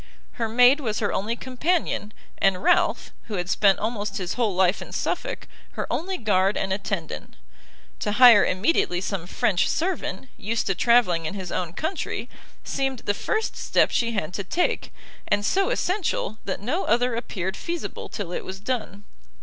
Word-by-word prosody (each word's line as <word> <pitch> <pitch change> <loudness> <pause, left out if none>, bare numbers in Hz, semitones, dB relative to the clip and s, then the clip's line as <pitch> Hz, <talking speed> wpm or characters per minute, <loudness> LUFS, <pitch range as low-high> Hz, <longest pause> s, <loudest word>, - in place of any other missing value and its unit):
Her 230 -2 -3
maid 250 +5 +6
was 220 -7 -2
her 205 - 0
only 220 +4 -1
companion, 260 - -1 0.3
and 190 -1 +2
Ralph, - - +2
who 215 - -5
had 180 0 -2
spent 200 -2 +4
almost 210 -2 -3
his 185 -3 -2
whole 225 -6 0
life 185 +1 +3
in - - -9
Suffolk, - - -3 0.3
her - - -3
only 375 +3 -2
guard 195 -2 +2
and 190 - 0
attendant. 195 -4 -4 0.6
To 210 - -1
hire 235 -2 +8
immediately 185 - +1
some 185 -2 -4
French 185 0 +1
servant, 320 - -2
used 230 +2 -1
to 195 - +1
travelling 185 -8 +3
in 195 - -5
his 185 -3 -5
own 175 -3 -2
country, 320 - -3 0.3
seemed 270 -3 -2
the 205 - 0
first 435 - -2
step - - +2
she 235 -1 +1
had 185 -5 -2
to 200 - -3
take, 345 - -1 0.4
and 205 0 +1
so 390 - +2
essential, 365 - -1
that 195 - -3
no 290 - -1
other 245 +1 +2
appeared 190 -5 -3
feasible 340 +7 -5
till 200 -5 -5
it - - -3
was 190 +1 -7
done. 210 -3 -3
210 Hz, 170 wpm, -25 LUFS, 190-250 Hz, 0.6 s, hire